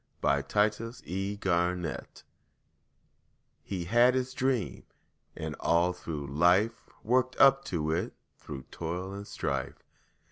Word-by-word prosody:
HE - - +2
HAD 90 +10 +3
HIS 115 +2 -8
DREAM 90 -1 -1 1.8
He 95 -3 -4
had 120 +6 +5
his 130 0 -1
dream, 130 -4 -1 0.5
and - - -4
all 85 +2 +3
through 80 -5 -5
life, 90 - +2
Worked 125 +2 +2
up 135 0 +7
to 80 -3 -1
it 85 +3 -1 0.3
through 70 -3 -7
toil 90 +3 -4
and 100 +1 -7
strife. - - -3
95 Hz, 115 wpm, -30 LUFS, 85-115 Hz, 1.8 s, up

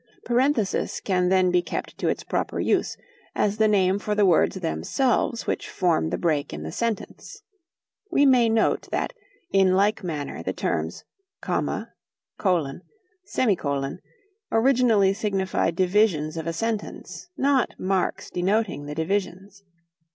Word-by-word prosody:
"Parenthesis" 245 -4 +1
can 180 -2 +1
then 185 -1 +3
be 180 0 +3
kept - - -5
to - - -1
its - - -1
proper - - -2
use, - - 0 0.4
as 205 0 +1
the 220 0 +4
name 195 -2 +2
for 210 0 -2
the 205 -1 +4
words 180 0 +3
themselves 230 - 0
which - - -3
form 170 - +1
the - - -2
break 155 -4 0
in 75 - -6
the 80 - -5
sentence. 230 -3 -4 0.7
We 285 - +3
may 250 -4 +5
note 225 0 +1
that - - -2 0.4
in 190 -1 +4
like 205 +2 +2
manner 150 - -4
the - - -3
terms 80 +2 -2 0.4
"comma," - - -2 0.5
"colon," 170 -7 0 0.4
"semicolon," 140 - -1 0.5
originally 225 -5 +4
signified 195 -5 -1
divisions 180 -4 +2
of 160 0 -4
a 165 - -1
sentence, 225 - -4
not 270 -3 +2
marks 190 0 -1
denoting 180 -5 0
the 150 - -5
divisions. 195 +3 -3
190 Hz, 135 wpm, -24 LUFS, 170-220 Hz, 0.7 s, may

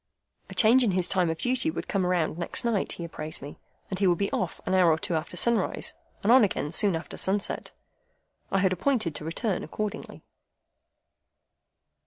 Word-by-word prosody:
A - - -9
change 245 +3 +5
in 210 -6 +2
his 180 -1 +1
time 180 -3 +1
of 160 - -2
duty 255 - 0
would - - -5
come 190 -3 0
round 175 -4 +1
next 175 - 0
night, 230 -4 0
he 170 - -7
had 170 - -7
apprised 155 0 -4
me, 145 +2 -10 0.3
and 190 - -3
he 200 - +3
would 175 -1 +3
be 200 +2 -1
off 180 -3 -2
an 185 - -1
hour 185 -2 +5
or 155 - +2
two 170 - -1
after 165 +2 -3
sunrise, 235 +2 +1 0.3
and 210 - +3
on 255 -1 +8
again 150 -7 -1
soon 195 0 +2
after 165 - -6
sunset. 200 +1 -1 0.8
I 195 - +2
had 190 -1 +3
appointed 215 - 0
to 150 - -5
return 185 +4 -2
accordingly. 210 +6 -5
185 Hz, 195 wpm, -27 LUFS, 170-215 Hz, 0.8 s, on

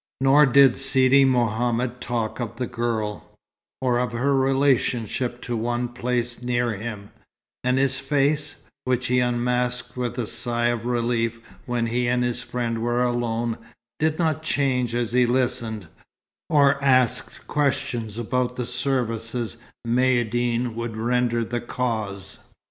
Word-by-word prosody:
Nor 135 +2 +6
did 135 -1 +6
Sidi 135 0 +4
Mohammed 120 0 0
talk 115 -2 -2
of 120 -3 -4
the 125 - -2
girl, 110 -3 -3 0.5
or 125 -2 +2
of 125 -2 -1
her 135 +4 +1
relationship 130 -3 +1
to 120 - -3
one 120 +2 -1
placed 120 0 -2
near 120 -1 0
him; 105 -1 -7 0.5
and 125 +1 +2
his 135 -1 +1
face 145 +1 0 0.3
(which 125 -1 0
he 125 +1 +2
unmasked 125 0 -1
with 125 -1 -3
a 120 - -1
sigh 120 +2 0
of 120 -1 -2
relief 115 -1 0 0.3
when 120 -1 0
he 120 +1 0
and 125 0 +2
his 120 -1 -1
friend 115 -2 -3
were 120 +1 +1
alone) 120 -1 -1 0.4
did 155 0 +1
not 160 -3 0
change 130 -6 0
as 120 -2 -1
he 125 0 +3
listened, 120 -5 -1 0.6
or 140 -2 +4
asked 130 -3 +2
questions 120 -6 -1
about 125 +2 -1
the 125 - -3
services 120 -2 -1 0.3
Maïeddine 120 -1 +1
would 115 -1 -5
render 120 0 +1
the 120 +1 -3
Cause. 110 -6 -3
120 Hz, 135 wpm, -24 LUFS, 115-130 Hz, 0.6 s, Nor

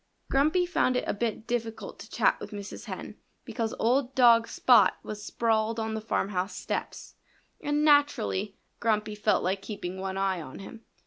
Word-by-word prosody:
Grumpy 310 +7 +3
found 255 -8 +1
it - - -1
a - - -1
bit 220 +1 -3
difficult 230 -2 -4
to - - -10
chat - - +2
with - - -7
Mrs. 205 +1 -8
Hen 205 +1 -7 0.3
because 230 -1 -3
old 255 +3 +1
dog 235 -2 +6
Spot 230 -5 +5
was 210 -1 -7
sprawled 225 0 0
on 220 0 -2
the 220 - -3
farmhouse 195 -3 -2
steps; - - -5 0.5
and 295 +1 +1
naturally 275 -9 +2 0.2
Grumpy 215 -2 0
felt 210 0 +1
like 190 +2 -1
keeping 190 -4 -6
one 190 0 -4
eye 190 -2 0
on 130 -4 -9
him. 225 +3 -10
220 Hz, 170 wpm, -28 LUFS, 200-245 Hz, 0.5 s, dog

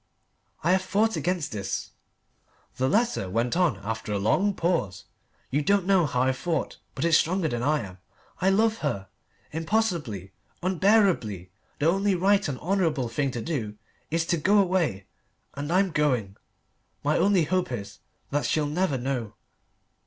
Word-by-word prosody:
"I 170 - +3
have 185 0 +3
fought 205 +4 +1
against 180 -3 -1
this," 100 -2 -4 0.9
the 130 +1 +1
letter 220 - +1
went 115 - 0
on 170 - +2
after 110 0 -4
a 105 - 0
long 190 - +2
pause. 165 - -1 0.5
"You 145 +3 +2
don't 200 +4 +2
know 190 -4 +4
how 125 -2 +1
I've 130 0 +1
fought, 165 -2 -2 0.2
but - - -1
it's 165 -2 +5
stronger 180 0 0
than 120 -5 -2
I 150 +3 +1
am. 95 -3 -9 0.4
I 190 - +4
love 220 +3 +2
her 100 -10 -3 0.4
impossibly, 160 - -1 0.3
unbearably 185 - +2 0.3
the 145 - -1
only 195 +3 +2
right 195 +2 +3
and 140 -3 -3
honourable 165 -9 0
thing 140 +4 0
to 120 -3 -4
do 115 -11 -3 0.3
is 165 +1 0
to 170 - +1
go 195 +7 +3
away, 175 - +1 0.5
and 145 +3 -4
I'm 190 +1 +3
going. 125 -11 0 0.7
My 150 +2 +2
only 195 -3 +4
hope 180 0 0
is 100 -5 -6 0.3
that 145 +1 0
she'll 155 -1 +1
never 150 -1 0
know. 125 -4 -3
155 Hz, 160 wpm, -26 LUFS, 120-185 Hz, 0.9 s, it's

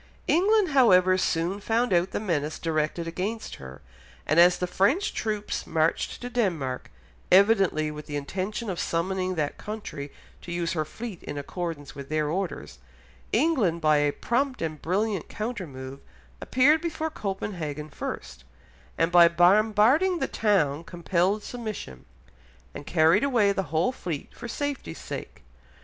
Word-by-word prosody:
England, 405 +3 +3
however, 185 -10 +5
soon 180 +1 0
found 225 +1 0
out 175 +1 +3
the - - -3
menace 160 -7 -1
directed 160 +1 -1
against 200 +7 -4
her, 65 -1 -11 0.4
and 155 +3 +3
as 175 +1 +7
the 180 - -1
French 205 - +1
troops 210 -2 -3
marched 160 0 0
to 245 - -4
Denmark, 170 - -2 0.4
evidently 190 -6 +4
with 150 0 -9
the 145 - -5
intention 190 +10 -3
of 175 - -5
summoning 185 +2 -1
that 150 -3 -2
country 205 -10 -6 0.3
to 175 - -8
use 175 0 -1
her 155 -3 -1
fleet 220 +3 -8
in 145 - -6
accordance 155 0 -5
with 140 -1 -9
their 155 -1 0
orders, 180 - -4 0.5
England 230 - +2
by 155 -2 +4
a 145 0 +2
prompt 255 - -1
and 155 -2 -4
brilliant 195 +1 -1
countermove 145 - -6 0.4
appeared 290 +5 +4
before 320 -2 -3
Copenhagen 175 - -4
first, 65 - -6 0.5
and 165 +1 +2
by 175 -1 +8
bombarding 215 - +4
the - - -1
town 165 -9 +1
compelled 180 +4 0
submission, 215 - -7 0.7
and 145 - -9
carried 165 +6 +4
away 235 -8 +3
the 195 -5 -2
whole 165 - +1
fleet 170 - -6
for 240 - -8
safety's 285 +3 -4
sake. - - -8
185 Hz, 145 wpm, -26 LUFS, 155-220 Hz, 0.7 s, by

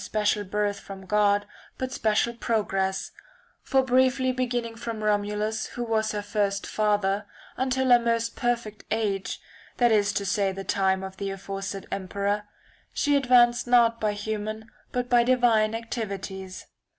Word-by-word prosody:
special 210 -1 0
birth 205 +1 -1
from 195 -1 -10
God 205 +1 +2 0.3
but 260 0 -3
special 220 +1 +1
progress; 195 -5 -1 0.5
for 265 -1 +2
briefly 260 0 +3
beginning 245 -2 -2
from 225 -1 -5
Romulus, 210 +1 0
who 245 - -5
was 220 -2 0
her 205 -1 -3
first 200 -1 -1
father, 205 -1 0 0.3
until 260 0 0
her 245 - +8
most 230 -1 0
perfect 235 -3 -2
age, 205 -3 -1 0.4
that 240 -1 +4
is 205 -2 +3
to 200 - -1
say 200 -1 +1
the 195 +1 -6
time 190 -1 +1
of 190 0 -7
the 200 - -3
aforesaid 195 0 -5
emperor, 200 +2 -2 0.5
she 290 -1 +1
advanced 245 -3 +4
not 235 -1 +4
by 210 -1 +1
human 215 +1 -4 0.2
but 250 0 -1
by 245 -1 +5
divine 235 -3 +3
activities. 195 -5 -5
215 Hz, 145 wpm, -26 LUFS, 200-240 Hz, 0.5 s, her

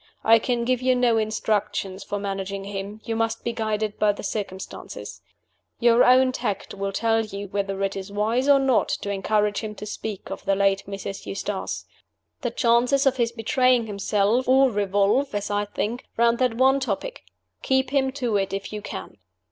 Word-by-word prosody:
I 225 +1 +6
can 235 0 -1
give 255 0 +1
you 255 0 +3
no 240 -2 +3
instructions 210 -3 -1
for 205 - -3
managing 195 -1 -4
him 200 +2 -6
you 225 - -3
must 225 0 -1
be 235 - -2
guided 215 -2 -2
by 210 -1 +4
the - - -9
circumstances. 195 -2 -6 0.6
Your 235 0 +5
own 255 +1 +5
tact 205 -5 -3
will 195 0 -3
tell 225 +2 +1
you 200 -2 -7
whether 195 0 -2
it 195 0 -1
is 195 +1 -6
wise 225 +6 0
or 285 - +8
not 270 -3 +2
to 200 - -2
encourage 205 +1 +1
him 215 -2 -6
to 210 - -8
speak 210 -1 -6
of - - -6
the 195 0 +2
late 195 0 +2
Mrs. 195 0 -6
Eustace. 200 0 -4 0.6
The - - -1
chances 245 +2 +2
of 265 -1 +3
his 235 -2 +1
betraying 245 +1 +2
himself 210 +3 +1
all 265 0 +5
revolve 205 +5 +1
(as 205 0 -2
I 205 0 0
think) 215 +3 -3
round 235 0 +3
that 250 -3 +2
one 265 +3 +4
topic: 265 - -3 0.4
keep 265 0 +1
him 270 -2 +2
to 245 -6 0
it 195 -1 -1
if 195 +2 -4
you 210 - -4
can." - - -8
215 Hz, 185 wpm, -24 LUFS, 200-245 Hz, 0.6 s, or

